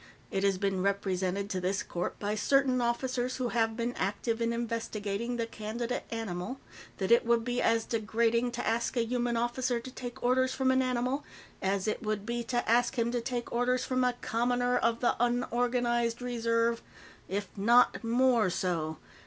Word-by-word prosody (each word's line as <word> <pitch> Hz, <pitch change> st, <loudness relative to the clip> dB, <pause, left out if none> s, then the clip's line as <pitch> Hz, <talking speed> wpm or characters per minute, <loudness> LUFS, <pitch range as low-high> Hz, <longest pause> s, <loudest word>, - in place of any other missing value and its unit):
It 195 Hz, -, -1 dB
has 195 Hz, -1 st, +3 dB
been 195 Hz, -1 st, 0 dB
represented 195 Hz, 0 st, 0 dB
to 185 Hz, -, -1 dB
this 190 Hz, +2 st, 0 dB
court, 175 Hz, +1 st, -4 dB
by 205 Hz, 0 st, -2 dB
certain 260 Hz, +3 st, +2 dB
officers 250 Hz, +1 st, -1 dB
who 250 Hz, -2 st, -1 dB
have 225 Hz, -1 st, +1 dB
been 235 Hz, +1 st, -1 dB
active 225 Hz, +4 st, -2 dB
in 230 Hz, 0 st, +1 dB
investigating 230 Hz, -1 st, -3 dB
the 230 Hz, -, 0 dB
candidate 230 Hz, +2 st, -4 dB
animal, 225 Hz, +2 st, -4 dB, 0.4 s
that 190 Hz, +1 st, -1 dB
it 235 Hz, -, +6 dB
would 235 Hz, -1 st, +2 dB
be 245 Hz, 0 st, 0 dB
as 230 Hz, -1 st, +2 dB
degrading 230 Hz, +2 st, +1 dB
to -, -, -3 dB
ask 235 Hz, +3 st, 0 dB
a 235 Hz, -, +2 dB
human 240 Hz, 0 st, 0 dB
officer 240 Hz, +1 st, 0 dB
to 255 Hz, +2 st, -9 dB
take 245 Hz, -2 st, -7 dB
orders 260 Hz, +1 st, +2 dB
from 260 Hz, -1 st, +2 dB
an 260 Hz, 0 st, +3 dB
animal 255 Hz, +2 st, 0 dB, 0.4 s
as 195 Hz, +1 st, 0 dB
it 215 Hz, -, -1 dB
would 215 Hz, -3 st, -2 dB
be 235 Hz, +1 st, -2 dB
to 240 Hz, +1 st, -1 dB
ask 240 Hz, +3 st, +3 dB
him 235 Hz, 0 st, +1 dB
to 240 Hz, -1 st, -1 dB
take 240 Hz, 0 st, -3 dB
orders 250 Hz, +1 st, +1 dB
from 255 Hz, 0 st, +1 dB
a 250 Hz, 0 st, +2 dB
commoner 245 Hz, +2 st, +1 dB
of 230 Hz, 0 st, +1 dB
the 245 Hz, -, +3 dB
Unorganized 240 Hz, -1 st, +1 dB
Reserve, 230 Hz, -1 st, 0 dB, 0.5 s
if 200 Hz, +1 st, -2 dB
not 235 Hz, +5 st, +4 dB
more 235 Hz, -2 st, +3 dB
so. 165 Hz, -3 st, -1 dB
235 Hz, 180 wpm, -30 LUFS, 215-245 Hz, 0.5 s, it